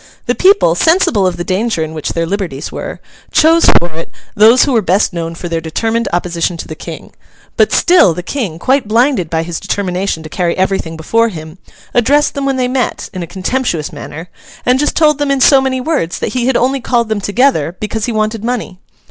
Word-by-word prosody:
The - - +1
people, 380 - +4
sensible 220 - +2
of 175 -1 -2
the 175 - -3
danger 190 -1 -1
in 160 0 -6
which 155 -2 -4
their 165 0 -1
liberties 175 -6 -4
were, - - -6 0.3
chose 330 +2 +4
for 175 0 -2
it 165 +1 -7 0.2
those 225 +4 +6
who 285 - 0
were 230 - +3
best 185 +1 +1
known 165 -1 -4
for 175 - -6
their 165 -1 -2
determined 225 +9 -1
opposition 175 0 -1
to - - -7
the - - -6
King; 155 - -9 0.4
but - - +3
still 345 - +4
the 180 - -5
King, 195 - -3
quite 260 +5 +1
blinded 230 - +1
by 160 0 -1
his 165 -1 -5
determination 185 -3 -2
to - - -8
carry 170 +1 -2
everything 190 -4 -1
before 230 +8 +1
him, 160 -2 -9 0.3
addressed 280 +5 +2
them 280 -1 -2
when 270 -1 0
they 250 -1 +1
met, 255 0 -2
in 185 - -5
a 170 - -5
contemptuous 185 - -2
manner, 155 +3 -8 0.4
and 250 +1 +3
just 295 - 0
told 300 -2 +3
them 290 -1 0
in 275 -1 +1
so 270 +1 +6
many 260 -1 -1
words 255 - -1
that - - -3
he 250 -1 0
had 265 - +2
only 265 +2 0
called 235 -1 0
them 215 -2 -2
together 200 - +1
because 215 +1 -3
he 245 - -2
wanted 215 0 -1
money. 235 -6 -3
205 Hz, 215 wpm, -14 LUFS, 170-255 Hz, 0.4 s, those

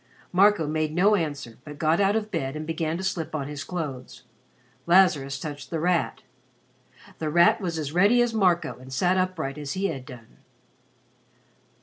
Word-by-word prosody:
Marco 200 -2 +4
made 155 0 -2
no 195 +4 +4
answer 145 - -4
but 150 -1 -10
got 160 +2 +2
out 200 +1 +3
of 215 -1 -2
bed 135 -6 -3
and 155 0 -5
began 160 0 -2
to 190 - -5
slip 165 -4 -3
on 140 -3 -3
his 145 -1 -6
clothes. 150 -8 -6 0.6
Lazarus 150 -7 +3
touched 145 -1 -7
The 165 - -2
Rat. 175 +1 0 1.0
The 155 - -2
Rat 175 +8 +4
was 170 -4 -3
as 150 -3 -3
ready 200 +8 +4
as 240 -1 -2
Marco 175 - +1
and 130 +1 -12
sat 180 +7 +1
upright 170 -7 -2
as 145 -2 -4
he 195 +1 -1
had 130 -2 -6
done. 120 -4 -13
160 Hz, 170 wpm, -25 LUFS, 145-185 Hz, 1.0 s, Marco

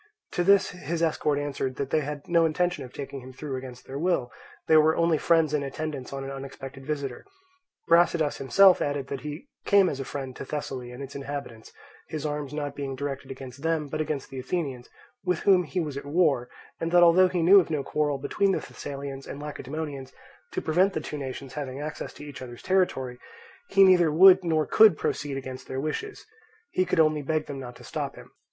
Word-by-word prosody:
To 175 - 0
this 200 +1 +4
his 170 -2 -3
escort 150 -2 +1
answered 140 -2 -2
that 140 0 -4
they 155 - +3
had 145 0 -6
no 170 -1 +4
intention 165 -1 0
of 125 - -10
taking 140 0 -6
him 130 +1 -10
through 140 +1 -5
against 130 -1 -8
their 135 +1 -6
will; 165 -8 0 0.4
they 160 - +5
were 155 +1 +5
only 170 -2 +2
friends 165 -3 +3
in 150 - +1
attendance 140 -1 -5
on 135 0 -5
an 135 - -5
unexpected 135 0 -8
visitor. 140 -4 -3 0.6
Brasidas 170 -2 +3
himself 185 +7 +5
added 145 -2 -2
that 140 -2 -4
he 150 - -7 0.2
came 200 -3 +5
as 140 - -4
a - - -2
friend 135 -1 -6
to - - -6
Thessaly 135 -4 -5
and 125 +3 -7
its 135 - -9
inhabitants, 140 -5 -6 0.4
his 155 -1 -5
arms 145 -2 -3
not 145 -1 -3
being 135 -2 -4
directed 140 0 -5
against 130 0 -9
them 160 -2 0
but 155 +2 -2
against 150 -3 -3
the 135 - -5
Athenians, 130 -3 -3 0.3
with 180 -3 0
whom 185 -3 +4
he 180 - -3
was 150 -5 -3
at 140 - -6
war, 145 -5 +2 0.3
and 165 - -2
that 175 0 +6
although 175 +2 +7
he 180 -2 -1
knew 195 +4 +8
of 175 - -1
no 150 -3 -1
quarrel 150 -1 0
between 195 +8 +1
the - - 0
Thessalians 140 -1 -7
and 140 - -7
Lacedaemonians 145 -1 -6 0.4
to - - -2
prevent 185 +5 +3
the - - -1
two 150 0 -6
nations 135 -1 -6
having 140 -2 -5
access 150 +1 -5
to 150 - -11
each 145 -3 -9
other's 120 -2 -9
territory, 135 -10 0 0.5
he 195 - +6
neither 180 -4 +6
would 185 +3 +8
nor 160 -3 +1
could 215 -7 +6
proceed 140 -2 -2
against 130 -1 -7
their 130 - -4
wishes; 155 - -4 0.5
he 185 - +1
could 180 - 0
only 155 -1 +4
beg 155 +2 -1
them 140 -1 -6
not 125 -2 -8
to - - -14
stop - - -4
him. - - -13
145 Hz, 210 wpm, -27 LUFS, 135-165 Hz, 0.6 s, knew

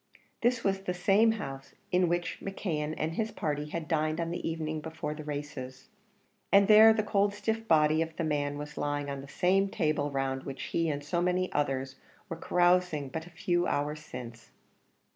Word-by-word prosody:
This 240 0 +2
was 195 -1 +1
the 180 -2 -3
same 210 +5 +4
house 135 -10 -7 0.2
in 180 0 +3
which 175 +1 -1
McKeon 160 -6 -3
and 160 +1 -2
his 220 +5 -1
party 150 -6 -3
had 165 0 -4
dined 155 +1 0
on 165 0 -2
the 170 - -3
evening 155 -1 -3
before 160 -1 -5
the 155 0 -8
races, 145 -2 -6 0.6
and 200 0 +6
there 220 +1 +9
the 220 -1 +1
cold 200 0 +1
stiff 225 +2 -2
body 155 0 +4
of 165 0 -3
the 165 - -2
man 145 -2 -1
was 150 0 -7
lying 145 -1 -2
on 140 -1 -5
the 140 - -11
same 195 +6 +2
table 150 -4 0
round 135 -1 -2
which 135 -1 -6
he 165 -1 0
and 145 -1 -3
so 170 +4 -1
many 180 +1 0
others 135 -2 -1 0.3
were 165 - -3
carousing 175 -4 +2
but 160 +5 -5
a - - -11
few 175 0 0
hours 150 +1 -1
since. 120 -6 -9
160 Hz, 190 wpm, -30 LUFS, 145-180 Hz, 0.6 s, there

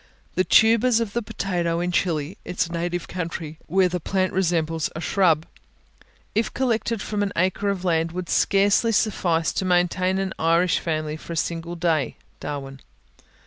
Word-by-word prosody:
The 185 - +2
tubers 225 +3 +5
of 225 -3 -3
the 235 - 0
potato 175 -5 -2
in 175 +1 -1
Chili, 165 -2 0
its 175 -1 -2
native 175 +1 -2
country, 165 -3 -5
where 185 +2 +3
the 180 0 -2
plant 185 +2 -1
resembles 165 -4 0
a - - -4
shrub, 170 -3 +2 0.9
if 220 +1 0
collected 230 -3 0
from 210 -1 -2
an 200 -1 0
acre 190 +3 +1
of 190 -2 -2
land, 165 -1 +1
would 180 0 -5
scarcely 200 +6 +3
suffice 175 -7 +1
to - - -1
maintain 185 +1 +2
an 195 0 -2
Irish 165 +2 +3
family 155 -2 -2
for 170 - -8
a - - -4
single 170 +1 -2
day 165 -4 0 0.2
(Darwin). 135 -2 -6
175 Hz, 160 wpm, -24 LUFS, 165-195 Hz, 0.9 s, tubers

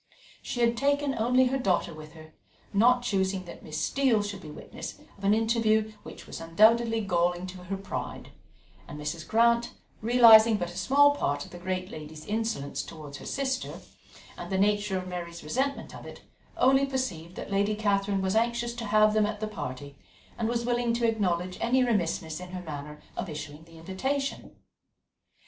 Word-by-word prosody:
She 245 - -4
had 235 0 +3
taken 285 +2 +1
only 250 +3 +3
her 265 +2 0
daughter 185 -6 +1
with 155 0 -11
her, 155 -1 -14 0.4
not 245 +4 +4
choosing 190 -4 0
that 175 - -10
Miss 155 - -5
Steele 260 -6 +2
should 205 -1 -5
be 155 - -10
a - - -8
witness - - -8 0.2
of 200 - -17
an 200 +2 +4
interview 220 -1 +2
which - - -11
was - - -8
undoubtedly 225 +7 +4
galling 175 -2 0
to 180 -1 -9
her 195 +2 -3
pride; 195 +1 -6 0.6
and 150 - -8
Mrs. 155 +2 -5
Grant, 235 +1 +3 0.3
realizing 225 -1 +7
but 175 -3 -3
a - - -12
small 280 +10 +5
part 145 - -1
of - - -15
the 175 - -9
great 185 +1 -3
lady's 155 0 -9
insolence 215 -10 -2
towards 150 -3 -9
her - - -9
sister, 265 -1 -2 0.7
and - - -7
the 190 - +1
nature 205 0 +2
of 185 0 -5
Mary's 175 -2 -6
resentment 265 - -2
of - - -10
it, - - -11 0.3
only 270 +2 +4
perceived 185 -11 -3
that - - -7
Lady 200 +2 +1
Catherine 200 -2 0
was 190 +2 0
anxious 235 +1 +1
to 230 - -4
have 215 0 +4
them 215 -1 +3
at 210 0 -4
the 215 - -2
party, 140 -7 -7 0.4
and 225 -1 -1
was 235 0 -1
willing 240 -1 +1
to 235 0 +1
acknowledge 185 -5 -1
any 255 +2 +3
remissness 170 -8 -1
in 180 0 -9
her 180 -1 -5
manner 150 -1 -7 0.2
of - - -4
issuing 150 0 -7
the 165 0 -16
invitation. 265 +12 -3
205 Hz, 185 wpm, -28 LUFS, 175-235 Hz, 0.7 s, realizing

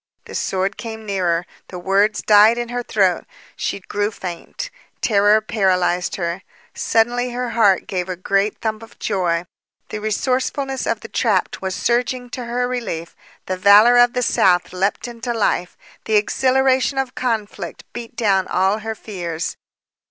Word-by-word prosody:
The - - -11
sword 195 +2 -1
came 220 -1 -7
nearer. 180 -4 0 0.2
The 180 - -8
words 200 +4 +1
died 215 +2 +6
in 240 -1 -3
her 245 0 -2
throat. 195 -6 +1 0.3
She - - -3
grew 205 +2 -1
faint. 195 - -7 0.3
Terror 210 0 +4
paralyzed 185 -4 +1
her. 170 0 -3 0.3
Suddenly, 240 +2 +1
her 245 -1 -3
heart 205 -5 +3
gave 185 -1 -3
a 185 - -2
great 195 +3 0
thump 220 -1 -2
of 225 - -14
joy. 180 -4 -1 0.4
The 215 - -4
resourcefulness 260 +4 -1
of 225 -2 -1
the - - -8
trapped 210 -7 0
was 190 -1 -3
surging 245 +1 -1
to 250 -1 -5
her 245 +1 -1
relief. 230 -10 -4 0.3
The 185 - -3
valor 210 +5 +7
of 245 0 +5
the 250 - 0
South 180 -5 +2
leaped 195 +5 -1
into 240 0 -4
life. 180 -5 0 0.3
The 220 - +1
exhilaration 265 +5 +2
of 265 -2 -1
conflict 210 -7 -3
beat 240 -1 -8
down 195 -5 +2
all 190 +3 +1
her 220 0 -4
fears. 175 -7 -5
215 Hz, 155 wpm, -20 LUFS, 190-240 Hz, 0.4 s, valor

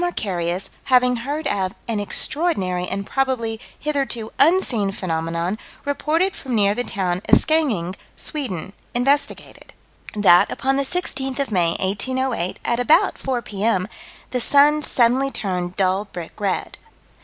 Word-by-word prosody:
Acharius, 190 - -2
having 250 -1 +4
heard 285 +7 -4
of 190 -1 0
"an 225 -3 -1
extraordinary 195 - 0
and 200 +2 -3
probably 245 -4 -1 0.2
hitherto 270 -7 -2
unseen 280 - +4
phenomenon," 170 +2 -2 0.3
reported 320 +7 0
from 255 -3 -4
near 200 -2 +4
the 245 - -2
town 185 -5 -2
of - - +8
Skeninge, 245 - +1 0.2
Sweden, 200 - -3 0.2
investigated: 275 +4 0 0.4
That, 195 -4 +5
upon 270 +1 0
the - - +2
16th 270 -4 -2
of 280 -4 -2
May, 170 -4 +2
1808, 220 0 -1
at 235 0 0
about 320 +10 +3
4 250 -3 -2
P.M., 200 -2 0 0.4
the 250 - 0
sun 290 +4 +4
suddenly 260 0 +2
turned 180 -7 -3
dull 190 +1 +1
brick 175 -5 -8
red. 200 -3 -2
230 Hz, 130 wpm, -21 LUFS, 190-275 Hz, 0.4 s, of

